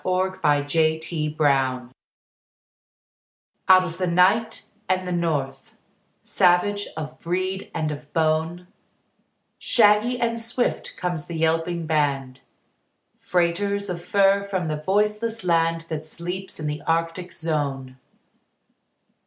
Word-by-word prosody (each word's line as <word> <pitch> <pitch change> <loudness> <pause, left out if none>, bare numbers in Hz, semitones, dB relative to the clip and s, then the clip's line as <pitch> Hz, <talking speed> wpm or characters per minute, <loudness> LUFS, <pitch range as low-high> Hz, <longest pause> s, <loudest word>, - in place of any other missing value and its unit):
THE 185 -6 +1
TRAIN 160 0 0
DOGS 130 -4 +1 1.8
Out 185 0 +8
of 165 -1 -7
the 185 - 0
night 185 +6 +2 0.2
and 185 0 0
the - - -3
north; 145 -6 -2 0.5
Savage 195 +3 +2
of 155 -1 -6
breed 185 +3 -3
and 155 -1 -2
of 150 0 -9
bone, 160 +2 0 0.9
Shaggy 225 +2 +3
and 230 -1 0
swift 235 +2 -1
comes 175 -4 -3
the 170 - -6
yelping 165 +1 0
band, 140 -4 -1 0.8
Freighters 195 +3 0
of 175 -1 -6
fur 200 +1 +3
from 190 -5 -3
the 155 - -2
voiceless 210 +4 0
land 165 -1 +2
That 160 -2 -5
sleeps 175 +4 -6
in 155 - -5
the 150 0 -3
Arctic 165 +2 -1
zone. 140 -5 -3
170 Hz, 110 wpm, -23 LUFS, 155-190 Hz, 1.8 s, Out